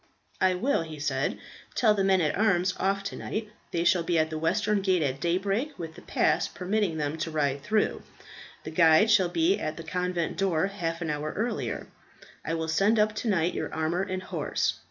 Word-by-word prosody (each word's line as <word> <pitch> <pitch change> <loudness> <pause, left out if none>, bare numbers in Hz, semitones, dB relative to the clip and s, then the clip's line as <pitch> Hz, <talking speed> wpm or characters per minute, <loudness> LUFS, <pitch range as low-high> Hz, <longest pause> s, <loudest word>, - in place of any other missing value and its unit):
"I 185 -1 +4
will," 245 +3 +1
he 160 -2 -7
said, 140 -1 -1 0.4
"tell 220 -3 +4
the 200 -2 0
men 190 -1 +3
at 155 - +1
arms 185 -4 +2
off 195 +1 0
to 200 - -5
night. 215 -1 -4 0.2
They 170 - -1
shall 175 0 +4
be 170 0 0
at 160 0 +1
the 155 - -3
western 205 +5 +1
gate 185 -4 +2
at 135 -1 -1
daybreak 195 - -1
with 165 -3 -6
the - - -13
pass - - +1
permitting 190 -2 -1
them 150 +1 -2
to 155 - -2
ride 145 -3 0
through. 215 +6 0 0.6
The 155 - -6
guide 165 +6 +5
shall 190 -5 +4
be 170 +2 +2
at 155 - -3
the 165 - -7
convent 180 0 -2
door 185 -4 +1
half 175 -4 -3
an 160 - -1
hour 150 +1 -3
earlier. 230 +4 -2 0.6
I 165 - -2
will 160 0 -2
send 195 +8 +3
up 215 0 +3
to - - -3
night 180 -4 +1
your - - -3
armour 160 +3 -1
and 185 -1 -3
horse. - - -1
180 Hz, 205 wpm, -27 LUFS, 160-200 Hz, 0.6 s, guide